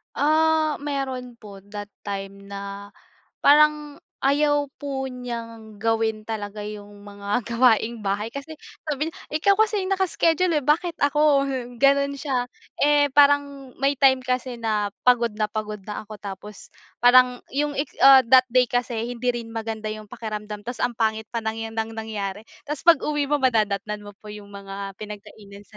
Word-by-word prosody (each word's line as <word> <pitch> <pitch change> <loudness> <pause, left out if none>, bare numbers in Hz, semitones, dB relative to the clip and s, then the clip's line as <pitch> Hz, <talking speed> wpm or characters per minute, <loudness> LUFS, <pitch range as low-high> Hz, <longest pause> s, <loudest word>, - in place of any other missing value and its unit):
Ah, 310 0 +2
meron 270 -4 -4
po 205 -2 -11 0.2
that 205 0 -6 0.2
time 200 0 -6
na 200 0 -8 0.5
parang 300 0 +4 0.2
ayaw 290 0 +2
po 275 -2 -3
n'yang 230 -4 -7
gawin 220 0 0
talaga 210 -1 -5
yung 205 -1 -9
mga 205 +3 -3
gawaing 235 0 +2
-bahay, 205 +2 -2
kasi 285 +3 -7 0.3
sabi 305 +2 -2
niya, - - -16 0.2
"Ikaw 365 +6 +4
kasi 420 -1 +2
yung 380 - -1
naka-schedule, 360 -3 +2
eh, 295 - -1
bakit 330 +4 +1
ako, 285 -1 +3
hmm?" 250 -3 -4
gano'n 280 +2 +3
siya. 260 -3 -2 0.3
Eh, 290 -1 +4
parang 280 -2 +3
may 275 +1 0
time 265 -2 +4
kasi 255 -1 -2
na 215 -3 -1 0.2
pagod 245 -1 +4
na 215 - +1
pagod 210 -1 -5
na 210 0 -7
ako, 215 - -8
tapos 200 +1 -10 0.3
parang 250 0 +6
yung 290 +1 -1
it's 285 -1 -2
ah, 270 -1 +8
that 255 +2 +5
day 250 +1 +4
kasi, 245 -1 -2 0.2
hindi 245 +1 -3
rin 235 -2 -2
maganda 220 -1 -4
yung 215 -1 -9
pakiramdam, 210 -2 -6
ta's 245 0 -6
ang 240 -1 -1
pangit 220 -1 -1
pa 230 -1 -4
ng 220 0 -3
'yan 225 - -12
ng 225 0 -2
nangyari. 215 -2 -5 0.2
Ta's 295 -1 -4
pag-uwi 300 -3 +3
mo 295 - +3
madadatnan 215 -5 0
mo 205 -1 -12
po 210 0 -11
yung 210 -1 -10
mga 195 -1 -8
pinagkainan 205 -1 -11
sa 215 - -16
240 Hz, 165 wpm, -24 LUFS, 210-280 Hz, 0.5 s, ah